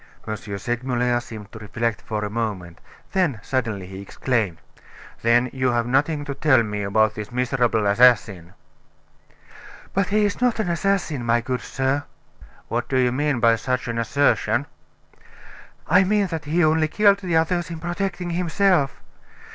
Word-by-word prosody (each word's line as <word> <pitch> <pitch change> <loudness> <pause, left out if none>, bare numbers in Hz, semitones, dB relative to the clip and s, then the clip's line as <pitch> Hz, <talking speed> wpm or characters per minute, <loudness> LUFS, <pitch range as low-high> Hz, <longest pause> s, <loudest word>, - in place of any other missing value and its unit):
Segmuller 120 +2 -1
seemed 110 -4 -10
to 110 - -10
reflect 115 +2 -2
for 105 -1 -3
a - - -4
moment; 100 -7 -4 0.3
then, 175 - +1
suddenly, 110 -7 -2
he 95 +1 -9
exclaimed: 105 -3 -1 0.6
"Then 120 +2 +3
you 130 -1 0
have 120 -1 +1
nothing 145 +4 +1
to 140 - -4
tell 130 -4 +3
me 105 -1 -4
about 110 +2 +2
this 105 +1 -7
miserable 120 -3 +1
assassin?" 100 -5 +3 1.4
"But 195 -1 +1
he 210 +1 +2
is 205 +3 -2
not 245 -2 +2
an 215 - 0
assassin, 170 -6 0
my 120 0 +2
good 125 +1 -3
sir." 135 +2 -1 0.6
"What 120 +1 -3
do 130 - +1
you 125 -1 +3
mean 145 0 0
by 115 0 +4
such 125 +1 -2
an 115 -1 -2
assertion?" 120 -1 +1 1.2
"I 180 +4 +5
mean 205 +1 +2
that 165 -4 -5
he 165 +3 +2
only 155 0 +3
killed 200 +4 +3
the 180 -4 0
others 175 +2 0
in 165 - -5
protecting 175 +1 -3
himself. 175 -3 +1
130 Hz, 155 wpm, -23 LUFS, 115-165 Hz, 1.4 s, I